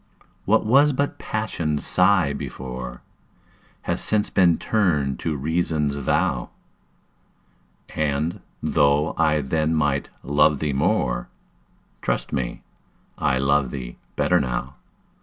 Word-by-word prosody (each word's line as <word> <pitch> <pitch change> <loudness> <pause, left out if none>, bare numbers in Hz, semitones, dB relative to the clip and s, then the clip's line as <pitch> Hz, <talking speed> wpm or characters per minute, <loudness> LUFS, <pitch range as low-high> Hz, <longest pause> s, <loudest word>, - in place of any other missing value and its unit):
What 110 +2 +3
was 140 +6 +5
but 140 +2 -2
Passion's 80 -9 -2
sigh - - +3
before, 60 -1 -7 0.8
Has - - 0
since 105 -1 +2
been 90 -4 +4
turned 80 -11 0
to 80 -2 -2
Reason's 75 -1 -1
vow; 70 - 0 1.5
And, 75 +2 -1 0.2
though 70 +1 +2
I 75 -1 +2
then 80 +3 0
might 75 -2 0
love 75 +2 +3
thee 75 0 -2
more, 65 - 0 0.7
Trust - - -2
me, 65 -3 -3 0.6
I 65 - +1
love 70 0 +2
thee - - -7 0.2
better - - +3
now. 65 +2 -3
75 Hz, 110 wpm, -23 LUFS, 70-85 Hz, 1.5 s, was